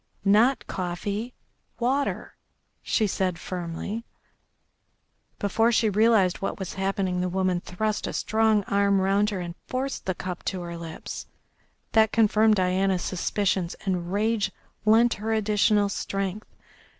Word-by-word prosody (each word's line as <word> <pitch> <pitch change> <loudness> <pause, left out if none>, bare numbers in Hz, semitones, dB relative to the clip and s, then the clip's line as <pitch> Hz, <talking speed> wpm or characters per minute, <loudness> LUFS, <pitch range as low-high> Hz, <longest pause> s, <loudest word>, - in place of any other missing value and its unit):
Not 220 +7 +4
coffee. 200 +6 -4 0.4
Water," 265 +4 -1 0.5
she 220 - +1
said 185 -3 -1
firmly. 180 +6 -5 1.3
Before 225 +3 +2
she 225 -2 +2
realised 210 -3 +4
what 195 - -2
was 190 -3 -5
happening 190 -1 -1
the 180 - 0
woman 185 -1 0
thrust 215 +4 -2
a - - -4
strong 220 -1 +2
arm 200 0 +2
round 200 +2 +2
her 195 -4 -3
and 175 -1 -5
forced 265 -2 -3
the 185 - 0
cup 180 -1 -5
to 185 -2 -2
her 170 -1 -6
lips. 165 -1 -7 0.6
That 220 -1 +4
confirmed 220 -1 +4
Diana's 185 -1 +1
suspicions 185 -1 -1
and 180 -2 -1
rage 215 +1 +1 0.3
lent 230 +2 +5
her 225 +1 -1
additional 210 -1 +3
strength. 195 +1 -3
200 Hz, 130 wpm, -26 LUFS, 185-220 Hz, 1.3 s, lent